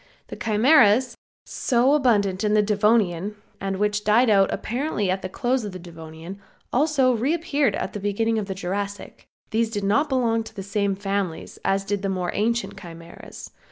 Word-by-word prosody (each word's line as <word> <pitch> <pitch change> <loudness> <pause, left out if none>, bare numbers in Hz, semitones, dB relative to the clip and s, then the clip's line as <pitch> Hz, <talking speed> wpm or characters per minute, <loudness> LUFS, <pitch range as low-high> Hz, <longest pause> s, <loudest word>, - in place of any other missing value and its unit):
The - - -6
Chimeras, 230 +1 +4 0.3
so 255 +3 +1
abundant 210 -9 +2
in 210 0 +2
the 210 - +4
Devonian 210 -2 +1 0.2
and 195 -1 -3
which 210 +1 0
died 220 +3 +4
out 195 -2 +4
apparently 235 -5 -2
at 190 +1 -2
the 185 - -5
close 250 +3 -1
of 205 -3 -6
the - - -6
Devonian, 165 +2 -10 0.3
also 270 -2 +3
reappeared 290 - 0
at - - -4
the 205 - -4
beginning 220 +3 0
of 205 - -4
the 190 - -4
Jurassic. 200 +2 -5 0.2
These 225 0 +1
did 205 -3 -4
not 280 +10 +2
belong 235 -4 +1
to - - -12
the 195 - -6
same 200 0 -1
families 195 -4 -4
as 195 0 +1
did 205 0 -2
the 195 - -2
more 180 -2 -2
ancient 230 +3 -1
Chimeras. 170 0 -11
210 Hz, 175 wpm, -23 LUFS, 195-235 Hz, 0.3 s, Chimeras